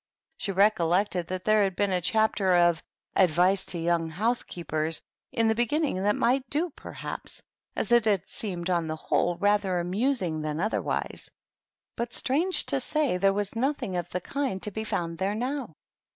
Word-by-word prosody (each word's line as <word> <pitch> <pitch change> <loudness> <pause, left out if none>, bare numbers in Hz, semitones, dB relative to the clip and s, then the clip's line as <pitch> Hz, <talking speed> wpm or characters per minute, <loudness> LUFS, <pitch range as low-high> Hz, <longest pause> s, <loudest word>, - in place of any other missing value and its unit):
She 200 - -2
recollected 185 -2 +2
that 185 0 -5
there 215 0 +4
had 190 -2 -1
been 205 0 +1
a 180 -1 +1
chapter 205 -1 +2
of 175 -1 +4
^^ - - -14 0.3
Advice 185 +2 +3
to 175 - 0
Young 165 -1 0
Housekeepers^^ 165 -6 0 0.3
in 225 -1 +2
the 220 - +4
beginning 240 - 0
that 205 +1 +2
might 255 +1 +1
do 325 +4 0
perhaps, - - -7 0.3
as - - -1
it 240 -2 +5
had 200 -5 +2
seemed 185 -4 -3
on 170 -2 +1
the 155 - -2
whole 175 +2 0
rather 200 -2 +2
amusing 185 - 0
than 155 0 -3
otherwise. 215 +5 -2 0.7
But, 235 +1 -3
strange 335 +8 +1
to - - 0
say, 300 -10 0
there 195 +2 +3
was 205 +1 -2
nothing 250 -5 -1
of 175 -1 -3
the 180 - -3
kind 270 -3 -2
to 210 - -1
be 220 +2 -4
found 170 -5 -3
there 195 +2 0
now. 250 - -3
195 Hz, 175 wpm, -27 LUFS, 175-230 Hz, 0.7 s, it